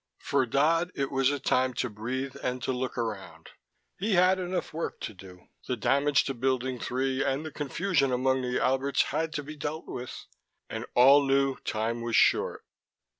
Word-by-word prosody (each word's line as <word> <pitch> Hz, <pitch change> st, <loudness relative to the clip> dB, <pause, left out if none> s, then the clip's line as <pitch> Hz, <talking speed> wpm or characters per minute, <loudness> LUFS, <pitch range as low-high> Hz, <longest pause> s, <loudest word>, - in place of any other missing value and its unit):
For 130 Hz, -, 0 dB
Dodd, 165 Hz, +7 st, +2 dB
it 135 Hz, -1 st, -2 dB
was 135 Hz, -1 st, +2 dB
a 145 Hz, 0 st, -1 dB
time 130 Hz, -1 st, +1 dB
to -, -, -1 dB
breathe 125 Hz, +5 st, -4 dB
and 125 Hz, 0 st, -3 dB
to -, -, 0 dB
look 130 Hz, 0 st, -3 dB
around. 110 Hz, -5 st, -5 dB, 0.5 s
He 205 Hz, +3 st, 0 dB
had 185 Hz, +1 st, +4 dB
enough 180 Hz, -2 st, -3 dB
work 165 Hz, +1 st, -4 dB
to 110 Hz, -, -5 dB
do: 90 Hz, -1 st, -14 dB, 0.2 s
the 125 Hz, -, -1 dB
damage 140 Hz, +5 st, +3 dB
to 135 Hz, -, -3 dB
Building 130 Hz, 0 st, -1 dB
Three, 130 Hz, +3 st, -1 dB
and 140 Hz, +3 st, -1 dB
the 155 Hz, -, -6 dB
confusion 145 Hz, 0 st, 0 dB
among 130 Hz, +1 st, +1 dB
the 125 Hz, 0 st, -1 dB
Alberts, 135 Hz, +2 st, +2 dB
had 160 Hz, 0 st, -2 dB
to 150 Hz, -, -3 dB
be 155 Hz, +2 st, -8 dB
dealt 150 Hz, +2 st, -4 dB
with, 125 Hz, 0 st, -7 dB, 0.4 s
and -, -, -5 dB
all 135 Hz, +3 st, +7 dB
knew 135 Hz, -1 st, +2 dB
time 115 Hz, +2 st, -2 dB
was 115 Hz, -1 st, -1 dB
short. -, -, +3 dB
135 Hz, 180 wpm, -28 LUFS, 125-145 Hz, 0.5 s, all